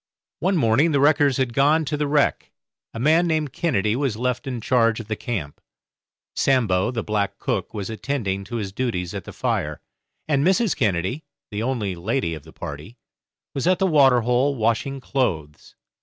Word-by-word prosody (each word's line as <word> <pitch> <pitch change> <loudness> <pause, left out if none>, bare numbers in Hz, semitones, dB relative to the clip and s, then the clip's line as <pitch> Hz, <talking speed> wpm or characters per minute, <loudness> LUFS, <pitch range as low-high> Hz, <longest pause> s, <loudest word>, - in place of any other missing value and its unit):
One 190 +2 +1
morning 145 +5 +3
the 140 - +3
wreckers 145 -2 +4
had 130 -3 0
gone 150 +5 +3
to 150 - -2
the 150 0 -1
wreck; 145 0 +1 0.4
a 115 - -7
man 160 +7 +4
named 155 -4 -1
Kennedy 110 - 0
was 130 -5 -1
left 125 +2 -2
in 125 -3 -3
charge 115 -1 +2
of 115 - -8
the 110 - -2
camp; 100 - -5 0.7
Sambo, 110 -9 +2
the 120 -2 -3
black 105 -2 -1
cook, - - -2
was 100 -3 -5
attending 110 -5 -2
to 120 - -7
his 105 -4 -3
duties 95 -6 -2
at - - -6
the - - -8
fire; - - -2 0.5
and 140 -2 +2
Mrs. 190 +4 +2
Kennedy, 100 - -1 0.3
the 105 +1 -3
only 115 -6 -1
lady 90 +1 -2
of 80 - -7
the 80 +2 -15
party, 75 - -8 0.6
was 140 +4 -2
at 185 0 +4
the 195 - +1
water 135 -8 +5
hole 125 +4 +1
washing 120 +4 -1
clothes. 85 - -3
125 Hz, 180 wpm, -23 LUFS, 105-145 Hz, 0.7 s, water